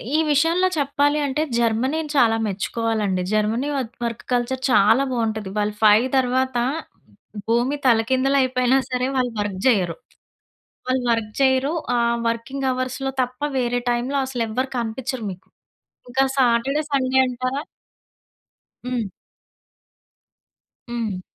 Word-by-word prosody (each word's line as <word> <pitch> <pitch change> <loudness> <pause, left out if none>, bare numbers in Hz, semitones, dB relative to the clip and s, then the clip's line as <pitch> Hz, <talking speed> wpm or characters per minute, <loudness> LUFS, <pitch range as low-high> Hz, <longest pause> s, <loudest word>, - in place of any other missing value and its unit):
ఈ - - +5
విషయంలో 330 +6 +3
చెప్పాలి 285 +1 +1
అంటే 280 +2 -1 0.2
జర్మనీని 260 +7 0
చాలా 230 -4 +5
మెచ్చుకోవాలండి. 205 -1 -1
జర్మనీ 220 +6 +1
వత్ 250 -3 -4
వర్క్ 235 -2 -3
కల్చర్ 245 +2 -1
చాలా 225 +3 +5
బావుంటది. 220 -4 -2
వాళ్ళు 210 0 0
5 215 +4 +6
తర్వాత 260 0 +1 0.9
భూమి 240 +5 +1
తలకిందలయిపోయినా 255 +2 +3
సరే, 250 0 0
వాళ్ళు 250 -1 +1
వర్క్ 205 -2 -3
జెయ్యరు. 190 -10 +3 0.9
వాళ్ళు 255 0 0
వర్క్ 225 -2 -1
చెయ్యరు. 265 +2 +3 0.2
ఆహ్, 235 0 +2
వర్కింగ్ 250 +4 -3
అవర్స్‌లో 255 +1 -2
తప్ప 250 0 -4 0.2
వేరే 245 -1 0
టైములో 245 +3 0
అసలెవ్వరు 250 0 -2
కనిపిచ్చరు 240 +2 -3
మీకు. 185 0 -12 0.6
ఇంకా 265 +2 +2
సాటర్డే, 260 +3 +2
సండే 265 -1 +2
అంటారా 255 +2 -3 1.3
హ్మ్. 235 -6 -2 1.8
హ్మ్. 225 -6 -3
250 Hz, 110 wpm, -22 LUFS, 225-265 Hz, 1.8 s, 5